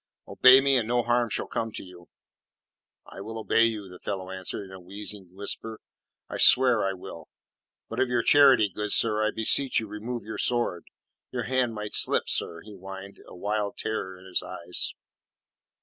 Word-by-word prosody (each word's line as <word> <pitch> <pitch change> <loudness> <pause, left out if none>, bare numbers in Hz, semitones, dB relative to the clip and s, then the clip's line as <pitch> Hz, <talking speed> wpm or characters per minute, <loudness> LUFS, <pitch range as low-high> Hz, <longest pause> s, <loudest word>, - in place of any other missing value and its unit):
Obey 130 +1 +7
me, 135 -1 +3
and 115 -3 -1
no 120 0 +1
harm 120 0 +1
shall - - -2
come 115 -1 -3
to - - -6
you." 90 -2 -15 1.0
"I - - -11
will 110 +3 -7
obey 115 +1 +3
you," 110 -3 -3
the 90 -1 -13
fellow 95 -2 -5
answered, 95 +1 -5
in 95 - -14
a 95 - -10
wheezing 100 +1 -9
whisper. 110 +2 -4 0.5
"I - - -6
swear 125 -4 +6
I 95 0 0
will. 90 -3 -11 0.6
But 115 - -6
of 130 - +2
your 120 -1 0
charity, 135 -7 +6
good 105 +2 -3
sir, 110 -1 +2
I 110 - +2
beseech 125 +5 +2
you 110 - -5
remove 110 +3 -6
your 110 +1 -7
sword. 120 -8 0 0.5
Your - - -3
hand 125 -2 0
might 105 0 -6
slip, - - +2
sir," 85 -1 0
he 105 +3 -12
whined, 95 +1 -10
a - - -12
wild 105 +2 -3
terror 95 -4 -4
in 90 - -16
his 95 - 0
eyes. 90 -1 -2
105 Hz, 185 wpm, -26 LUFS, 95-115 Hz, 1.0 s, Obey